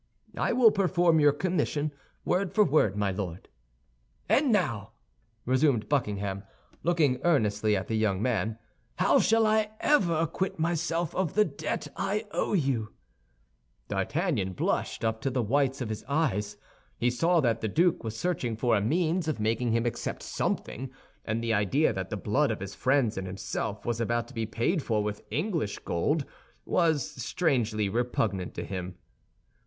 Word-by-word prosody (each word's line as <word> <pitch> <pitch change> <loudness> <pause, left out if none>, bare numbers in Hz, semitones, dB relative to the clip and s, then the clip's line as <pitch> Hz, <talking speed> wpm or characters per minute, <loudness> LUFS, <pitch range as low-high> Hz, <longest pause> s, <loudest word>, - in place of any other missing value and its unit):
"I - - 0
will 240 -2 +6
perform 175 -4 +3
your 145 -1 +6
commission, 150 -2 -1 0.3
word 190 0 +1
for 215 - +6
word, 135 - +2
my 100 -1 +1
Lord." 95 -2 -5 0.8
"And 275 -2 +3
now," 115 - 0 0.5
resumed 130 -2 +2
Buckingham, 100 -8 -1 0.4
looking 155 -7 +2
earnestly 110 -10 +2
at 95 - -4
the - - -3
young 110 -4 +1
man, 110 -2 0 0.4
"how - - +4
shall 225 0 +4
I 215 0 +2
ever 195 - +3
acquit 165 +4 -2
myself 165 0 -1
of 185 -5 -1
the 215 0 +5
debt 155 -1 -4
I 205 +3 -1
owe - - -1
you?" 135 - 0 1.0
D'Artagnan 105 - -1
blushed 90 - -1
up 110 0 -1
to 135 - 0
the 125 -2 0
whites 135 +3 +1
of 120 - -3
his 110 - -4
eyes. 110 -9 -1 0.4
He 120 +1 +1
saw 165 +8 +2
that 115 -6 +1
the 110 - 0
duke 170 - +2
was 110 -1 -5
searching 135 -10 -1
for 120 +1 +2
a 105 - +2
means 165 - +1
of 155 -7 -1
making 115 +2 0
him 115 +1 +1
accept 120 - -3
something 130 +3 -3 0.4
and 115 +1 -2
the 115 -1 +1
idea 110 +8 +2
that 95 -2 -4
the 105 - -3
blood 130 +9 +1
of 110 - -2
his 100 +1 -6
friends 130 -6 +1
and 95 - -5
himself 100 +2 -4
was 120 -1 -1
about 120 +1 0
to - - -13
be 115 -3 -2
paid 135 - 0
for 110 -5 0
with 105 0 -3
English 155 - -1
gold 140 - -1 0.4
was 160 -6 +2 0.2
strangely 115 - 0
repugnant 105 -4 -1
to - - -4
him. 90 -2 -5
125 Hz, 165 wpm, -28 LUFS, 105-165 Hz, 1.0 s, will